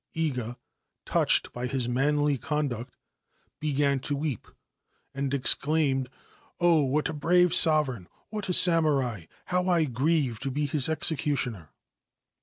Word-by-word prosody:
Iga, 125 -7 -3 0.5
touched - - +1
by 125 +1 -4
his 125 -1 -2
manly 145 +3 +1
conduct, 135 -3 -4 0.6
began 140 -2 0
to 145 +2 -3
wee 140 -5 -3 0.7
and 140 0 -3
exclaimed: 140 -1 +1 0.3
* - - -33
Oh, 170 -3 +3
what 140 +3 0
a - - -5
brave 175 +3 +2
sovereign! 150 - +3 0.2
what 210 -3 -5
a - - 0
samurai! 140 - +3 0.3
He - - 0
I 180 -2 +2
grieve 135 -2 -1
to 135 - -4
be 145 +3 -2
his 145 0 +1
executioner 140 - -1
145 Hz, 130 wpm, -26 LUFS, 130-160 Hz, 0.7 s, Oh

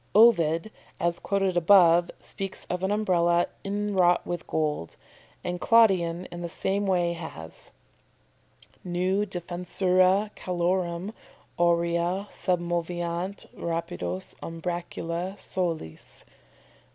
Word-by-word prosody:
Ovid 205 -4 +5 0.3
(as 170 0 0
above 190 -4 0
quoted) 175 -3 +6
speaks 195 -2 -6
of 180 +1 -2
an 190 - +1
Umbrella 175 -5 +2 0.2
inwrought 195 -3 +2
with 175 -1 -4
gold, 150 - -2 0.5
and 180 0 -3
Claudian 185 -7 +4
in 175 - -7
the 170 - -4
same 200 +4 -1
way 175 -2 +2
has: 160 - -9 1.1
"Neu 185 +3 0
defensura 185 +2 +1
calorem 180 +2 -1 0.5
Aurea 170 +3 +1
submoveant 175 +1 -2
rapidos 95 - -4
umbracula 170 +1 -4
soles." 165 - -4
175 Hz, 90 wpm, -27 LUFS, 170-190 Hz, 1.1 s, quoted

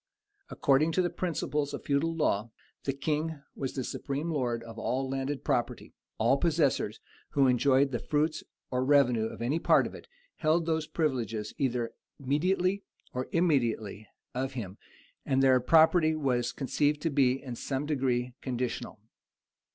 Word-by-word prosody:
According 145 +4 +2
to 185 - +2
the 175 - -1
principles 150 -4 -2
of - - -8
the - - -27
feudal 150 +4 +1
law, 115 -8 0 0.4
the 135 - +1
king 150 +3 -2
wa 135 - -3
the 130 0 -4
supreme 145 +6 -3
lord 120 -6 -1
of 115 -1 -10
the - - -5
landed 135 +2 -2
property: - - -1 0.2
all 120 +5 +3
possessors, 145 -9 +1 0.3
who 140 -2 +4
enjoyed 135 +2 +3
the 120 - -1
fruits 155 +1 0 0.3
or 125 0 +1
revenue 130 -5 +4
of 115 - -5
any 140 +7 0
part - - +4
of - - -6
it, - - -11 0.3
held 160 +1 +2
those 160 -2 0
privileges, 115 -9 -2
either 120 -4 0 0.3
mediately 180 +8 +1 0.3
or 125 0 -3
immediately, 120 - 0 0.3
of 130 +2 -2
him; 105 -6 -6 0.4
and 135 0 +1
their 130 -1 +6
property 160 +4 +5
was 125 -5 0
conceived 145 +2 0
to 165 - +1
be, 135 -3 +4
in 130 -4 -7
some 135 +3 -3
degree, 125 -4 0
conditional. 125 -4 -3
135 Hz, 155 wpm, -29 LUFS, 125-155 Hz, 0.4 s, their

